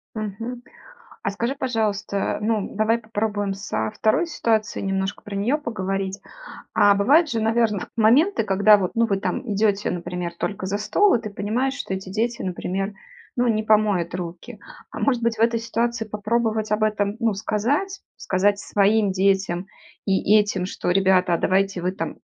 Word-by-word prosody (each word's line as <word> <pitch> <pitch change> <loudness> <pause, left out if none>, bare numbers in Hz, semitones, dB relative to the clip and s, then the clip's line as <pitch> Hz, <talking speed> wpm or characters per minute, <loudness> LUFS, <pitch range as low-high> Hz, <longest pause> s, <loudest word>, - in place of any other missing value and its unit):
Мгм. 225 +4 -5 0.6
А - - -1
скажи, 235 +7 -2
пожалуйста, 215 -6 -1
ну, 215 -2 -1
давай 220 +2 +2
попробуем 210 -3 -2
со 110 - -3
второй 220 +10 +2
ситуацией, 220 -10 -1
немножко 195 0 -2
про 205 -1 -7
нее 235 +10 +1
поговорить. 195 -6 -3 0.6
А 205 -1 +5
бывают 285 +11 +4
же, 225 - -1
наверно, 220 -3 +1
моменты, 250 - +4
когда 205 +1 +5
вот, 185 -3 -2
ну, 230 0 +3
вы 195 -2 0
там 245 - -2
идете, 205 0 +1
например, 175 0 -4
только 195 -2 -3
за 200 +2 -1
стол 385 - +3
и 235 - +2
ты 215 - -6
понимаешь, 235 +7 -1
что 195 -8 -4
эти 190 0 -6
дети, 225 +4 -2
например, 190 +2 -3 0.4
ну, 245 0 +2
не 220 -2 +1
помоют 210 -6 +2
руки. 175 -1 -7 0.3
А - - -7
может 250 -4 +1
быть, 230 -1 +1
в - - -5
этой 230 0 +2
ситуации 235 0 -1
попробовать 215 0 -1
об 215 +1 +1
этом, 205 -1 0
ну, 225 -2 +2
сказать? 280 - -1 0.2
Сказать 200 +2 +1
своим 205 0 +2
детям 190 -1 +1 0.4
и 195 +2 +3
этим, 205 -3 +1
что- 180 - -3
ребята, 185 -2 +3
а - - 0
давайте 195 -1 +1
вы 180 +1 -1
там - - -5
210 Hz, 165 wpm, -23 LUFS, 195-230 Hz, 0.6 s, А